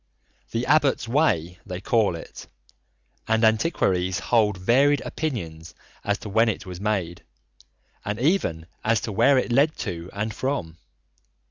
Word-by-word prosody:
"The 115 Hz, +2 st, -2 dB
Abbot's 145 Hz, -4 st, +2 dB
Way" 90 Hz, -, +1 dB
they 90 Hz, -1 st, -6 dB
call 110 Hz, -4 st, +1 dB
it, 80 Hz, -, -10 dB, 0.8 s
and 110 Hz, +1 st, +2 dB
antiquaries 95 Hz, -, +2 dB
hold 105 Hz, -4 st, +2 dB
varied 135 Hz, +10 st, +3 dB
opinions 85 Hz, -, -5 dB, 0.3 s
as 105 Hz, -1 st, 0 dB
to -, -, -5 dB
when 110 Hz, +3 st, +3 dB
it 110 Hz, -, -4 dB
was 90 Hz, 0 st, -8 dB
made, 95 Hz, -5 st, -2 dB, 0.8 s
and 105 Hz, +1 st, -3 dB
even 125 Hz, -, +1 dB, 0.2 s
as 115 Hz, 0 st, +2 dB
to 110 Hz, -, -4 dB
where 115 Hz, +7 st, +4 dB
it 125 Hz, -, 0 dB
led 140 Hz, +5 st, +3 dB
to 85 Hz, -2 st, -5 dB
and 110 Hz, +2 st, -3 dB
from. 105 Hz, -, -3 dB
110 Hz, 140 wpm, -24 LUFS, 90-130 Hz, 0.8 s, where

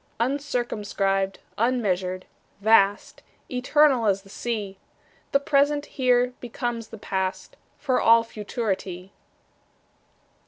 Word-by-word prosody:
Uncircumscribed, 220 Hz, -7 st, -1 dB, 0.2 s
unmeasured, 190 Hz, -6 st, 0 dB, 0.3 s
vast, 205 Hz, -1 st, +3 dB, 0.3 s
Eternal 260 Hz, -1 st, +3 dB
as 195 Hz, -1 st, +1 dB
the 195 Hz, -, -17 dB
Sea, 205 Hz, -3 st, -4 dB, 0.5 s
The 275 Hz, -, +4 dB
present 285 Hz, +1 st, +2 dB
here 250 Hz, -3 st, +1 dB
becomes 240 Hz, -1 st, -4 dB
the 225 Hz, -, -10 dB
past, 190 Hz, -2 st, -3 dB, 0.2 s
For 265 Hz, -4 st, 0 dB
all 230 Hz, 0 st, +6 dB
futurity. 200 Hz, -4 st, -4 dB
230 Hz, 90 wpm, -25 LUFS, 195-250 Hz, 0.5 s, all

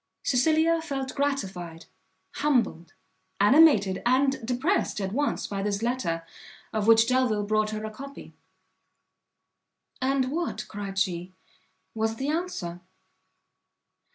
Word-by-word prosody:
Cecilia 315 Hz, +5 st, +3 dB
felt 270 Hz, -4 st, -4 dB
gratified, 190 Hz, -, -3 dB, 0.5 s
humbled, 235 Hz, -, 0 dB, 0.4 s
animated 205 Hz, -4 st, +5 dB
and 270 Hz, +1 st, +2 dB
depressed 255 Hz, -, 0 dB
at 190 Hz, -1 st, -2 dB
once 285 Hz, +6 st, -1 dB
by 200 Hz, -1 st, -3 dB
this 205 Hz, +1 st, -2 dB
letter, 200 Hz, -10 st, -1 dB, 0.5 s
of 215 Hz, -1 st, -1 dB
which 225 Hz, 0 st, +6 dB
Delvile 250 Hz, -5 st, +2 dB
brought 215 Hz, +1 st, +1 dB
her 215 Hz, 0 st, -4 dB
a 215 Hz, -, -5 dB
copy. 275 Hz, +5 st, -10 dB, 1.7 s
"And 260 Hz, 0 st, +1 dB
what," 300 Hz, -10 st, -3 dB
cried 200 Hz, -2 st, -6 dB
she, 180 Hz, -1 st, -1 dB, 0.6 s
"was 220 Hz, 0 st, -1 dB
the 270 Hz, +5 st, -3 dB
answer?" 300 Hz, -, -3 dB
230 Hz, 110 wpm, -27 LUFS, 200-275 Hz, 1.7 s, which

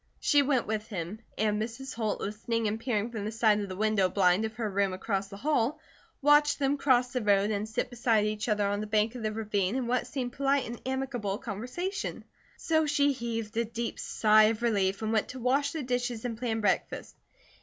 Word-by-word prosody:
She 290 Hz, -, +4 dB
went 270 Hz, -3 st, +1 dB
with 215 Hz, 0 st, -3 dB
him; 190 Hz, +1 st, -5 dB, 0.2 s
and 210 Hz, 0 st, +1 dB
Mrs. 245 Hz, +5 st, -5 dB
Holt, 220 Hz, -2 st, -2 dB
listening 220 Hz, +2 st, -2 dB
and 215 Hz, +2 st, -2 dB
peering 230 Hz, -2 st, -1 dB
from 220 Hz, -3 st, -4 dB
the 215 Hz, -, -3 dB
side 220 Hz, -2 st, +3 dB
of 200 Hz, -2 st, -4 dB
the 185 Hz, -, -5 dB
window 210 Hz, -2 st, +2 dB
blind 185 Hz, +2 st, +3 dB
of 220 Hz, 0 st, -5 dB
her 225 Hz, -1 st, -2 dB
room 200 Hz, -1 st, 0 dB
across 195 Hz, +1 st, -2 dB
the 200 Hz, 0 st, -10 dB
hall, 290 Hz, +2 st, 0 dB, 0.4 s
watched 295 Hz, 0 st, +5 dB
them 275 Hz, 0 st, +1 dB
cross 255 Hz, -3 st, +3 dB
the 250 Hz, -, 0 dB
road 205 Hz, 0 st, +3 dB
and 210 Hz, +1 st, -2 dB
sit 235 Hz, +3 st, -2 dB
beside 230 Hz, -3 st, +2 dB
each 215 Hz, +2 st, -2 dB
other 210 Hz, -1 st, +2 dB
on 205 Hz, 0 st, 0 dB
the 215 Hz, -, -4 dB
bank 215 Hz, +1 st, +1 dB
of 250 Hz, -, -7 dB
the 215 Hz, -1 st, -1 dB
ravine 210 Hz, -2 st, -1 dB
in 260 Hz, -2 st, -1 dB
what 245 Hz, +1 st, 0 dB
seemed 250 Hz, -3 st, -4 dB
polite 275 Hz, 0 st, +1 dB
and 235 Hz, 0 st, -7 dB
amicable 260 Hz, -7 st, -2 dB
conversation. 250 Hz, -, -4 dB, 0.3 s
So 315 Hz, -1 st, +1 dB
she 285 Hz, -1 st, +3 dB
heaved 230 Hz, -4 st, -4 dB
a 230 Hz, -, +3 dB
deep 230 Hz, +1 st, -4 dB
sigh 215 Hz, 0 st, +4 dB
of 225 Hz, +1 st, 0 dB
relief 200 Hz, -3 st, +1 dB
and 220 Hz, +1 st, -1 dB
went 220 Hz, -, +1 dB
to 260 Hz, -, -7 dB
wash 270 Hz, +4 st, +1 dB
the 315 Hz, -3 st, -4 dB
dishes 245 Hz, -2 st, -2 dB
and 235 Hz, -2 st, -2 dB
plan 225 Hz, -1 st, -2 dB
breakfast. 210 Hz, -, -1 dB
225 Hz, 215 wpm, -29 LUFS, 210-250 Hz, 0.4 s, watched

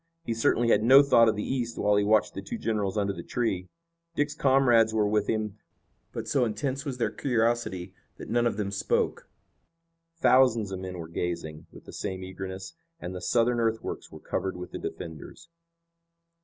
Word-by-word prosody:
He 115 Hz, -, -1 dB
certainly 115 Hz, +1 st, +2 dB
had 105 Hz, -, +4 dB
no 135 Hz, +5 st, +8 dB
thought 115 Hz, -5 st, +5 dB
of 110 Hz, -, 0 dB
the 105 Hz, -, -3 dB
East 120 Hz, -3 st, -2 dB
while 105 Hz, 0 st, +2 dB
he 105 Hz, -, +3 dB
watched 105 Hz, +1 st, +3 dB
the -, -, -5 dB
two 235 Hz, -, -5 dB
generals 105 Hz, -, -1 dB
under 100 Hz, -1 st, 0 dB
the 85 Hz, -, -7 dB
tree. 95 Hz, -4 st, -2 dB, 0.5 s
Dick's 145 Hz, 0 st, 0 dB
comrades 125 Hz, -6 st, +4 dB
were 105 Hz, -1 st, +3 dB
with 105 Hz, 0 st, +1 dB
him, 110 Hz, -1 st, -2 dB, 0.5 s
but -, -, -6 dB
so 135 Hz, -3 st, +2 dB
intense 130 Hz, +5 st, -2 dB
was 135 Hz, -3 st, -4 dB
their 120 Hz, -, 0 dB
curiosity 115 Hz, -7 st, -1 dB, 0.2 s
that -, -, -9 dB
none 120 Hz, 0 st, +2 dB
of 110 Hz, -, -2 dB
them 100 Hz, -2 st, -2 dB
spoke. 100 Hz, -, -1 dB, 0.9 s
Thousands 125 Hz, -9 st, +4 dB
of 95 Hz, -, -4 dB
men 95 Hz, -1 st, -6 dB
were 85 Hz, -2 st, -6 dB
gazing 85 Hz, -2 st, -4 dB
with -, -, -14 dB
the -, -, -11 dB
same 95 Hz, -2 st, -4 dB
eagerness, 95 Hz, +1 st, -7 dB, 0.3 s
and 90 Hz, -, -6 dB
the 90 Hz, -, -6 dB
Southern 120 Hz, +4 st, +2 dB
earthworks 115 Hz, -1 st, -2 dB
were -, -, -10 dB
covered 95 Hz, -1 st, -3 dB
with 90 Hz, -, -8 dB
the -, -, -6 dB
defenders. 85 Hz, -, -8 dB
110 Hz, 185 wpm, -27 LUFS, 95-120 Hz, 0.9 s, no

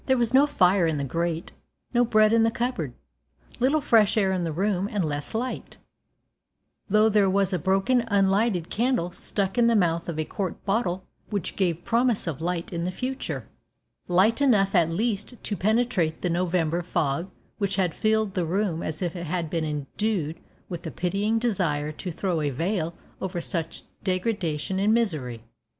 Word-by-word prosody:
There 260 Hz, -1 st, +4 dB
was 235 Hz, 0 st, +1 dB
no 275 Hz, +3 st, +6 dB
fire 185 Hz, -, +3 dB
in 160 Hz, -2 st, 0 dB
the 140 Hz, -, -2 dB
grate, 165 Hz, +4 st, -2 dB, 0.4 s
no 240 Hz, 0 st, +4 dB
bread 215 Hz, -2 st, +4 dB
in 230 Hz, -, +5 dB
the 225 Hz, -, +4 dB
cupboard, 225 Hz, -, -2 dB, 0.6 s
little 275 Hz, +5 st, +3 dB
fresh 225 Hz, -5 st, +4 dB
air 195 Hz, -3 st, +3 dB
in 185 Hz, -2 st, 0 dB
the 165 Hz, -, -2 dB
room 195 Hz, +3 st, 0 dB
and 205 Hz, -6 st, 0 dB
less 145 Hz, +5 st, -4 dB
light, 250 Hz, +3 st, -4 dB, 1.1 s
though 215 Hz, +2 st, +5 dB
there 210 Hz, -3 st, +4 dB
was 195 Hz, 0 st, +1 dB
a 180 Hz, -, +1 dB
broken 195 Hz, -, +2 dB
unlighted 195 Hz, -3 st, +2 dB
candle 235 Hz, -7 st, 0 dB
stuck 195 Hz, +4 st, -1 dB
in 235 Hz, -, +5 dB
the 235 Hz, -, +4 dB
mouth 170 Hz, -4 st, +1 dB
of 165 Hz, -, -4 dB
a 155 Hz, -, -1 dB
quart 190 Hz, +1 st, -4 dB
bottle 195 Hz, -3 st, 0 dB, 0.3 s
which 200 Hz, -5 st, -3 dB
gave 175 Hz, -3 st, 0 dB
promise 235 Hz, -1 st, +2 dB
of 160 Hz, -4 st, -4 dB
light 175 Hz, +1 st, -2 dB
in 170 Hz, 0 st, -2 dB
the 180 Hz, -, -1 dB
future 255 Hz, +7 st, -4 dB, 0.6 s
light 195 Hz, +8 st, +3 dB
enough 205 Hz, -8 st, +4 dB
at 170 Hz, -4 st, +4 dB
least 215 Hz, +6 st, -1 dB
to 205 Hz, -, -2 dB
penetrate 215 Hz, -6 st, +1 dB
the 180 Hz, -, +1 dB
November 175 Hz, -1 st, 0 dB
fog 165 Hz, 0 st, -1 dB, 0.3 s
which 200 Hz, -2 st, 0 dB
had 185 Hz, -4 st, +1 dB
filled 215 Hz, -2 st, +1 dB
the 180 Hz, -, 0 dB
room 175 Hz, 0 st, -1 dB
as 155 Hz, +3 st, -3 dB
if 175 Hz, -1 st, -2 dB
it 170 Hz, -1 st, -5 dB
had 165 Hz, -1 st, -2 dB
been 165 Hz, -2 st, 0 dB
endued 155 Hz, +3 st, -2 dB, 0.3 s
with 175 Hz, -3 st, -6 dB
a -, -, -2 dB
pitying 200 Hz, +7 st, 0 dB
desire 175 Hz, -10 st, 0 dB
to 165 Hz, +4 st, -6 dB
throw 175 Hz, -1 st, -1 dB
a 145 Hz, -, 0 dB
veil 170 Hz, +4 st, -2 dB, 0.3 s
over 185 Hz, -2 st, -3 dB
such 165 Hz, -1 st, -4 dB, 0.2 s
degradation 185 Hz, -3 st, -1 dB
and 210 Hz, +3 st, +3 dB
misery. 145 Hz, -, -1 dB
190 Hz, 180 wpm, -26 LUFS, 165-215 Hz, 1.1 s, no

